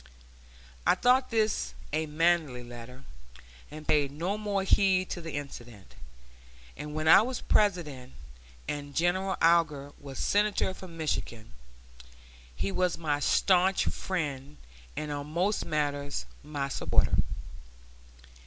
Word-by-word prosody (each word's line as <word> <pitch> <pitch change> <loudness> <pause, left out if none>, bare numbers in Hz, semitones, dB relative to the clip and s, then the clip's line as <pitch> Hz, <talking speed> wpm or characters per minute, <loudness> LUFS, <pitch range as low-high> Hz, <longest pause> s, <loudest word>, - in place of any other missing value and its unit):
I - - +4
thought 255 +1 +3
this 220 -2 0 0.2
a 155 +1 0
manly 155 -5 +1
letter, 120 +2 -10 0.7
and 155 +1 -10
paid 145 -2 +3
no 170 +7 -2
more 205 -2 -1
heed 190 -1 +3
to 175 - -3
the 165 -1 -7
incident; 120 -8 -8 0.8
and 150 +1 -7
when 155 0 -1
I 160 - +9
was 250 +3 -3
President, 150 -11 +1 0.5
and 145 -1 -5
General 185 +3 +1
Alger 160 -4 +3
was 140 -2 -9
Senator 205 -2 +1
from 185 -3 -11
Michigan, 120 - -3 1.0
he 95 +9 -2
was 180 - 0
my 150 -3 -1
stanch 185 +5 +3
friend 145 -6 -3 0.4
and 150 0 -3
on 145 0 -4
most 180 +7 0
matters 145 -2 -2 0.2
my 145 -2 -3
supporter. 140 - +1
155 Hz, 120 wpm, -29 LUFS, 145-185 Hz, 1.0 s, I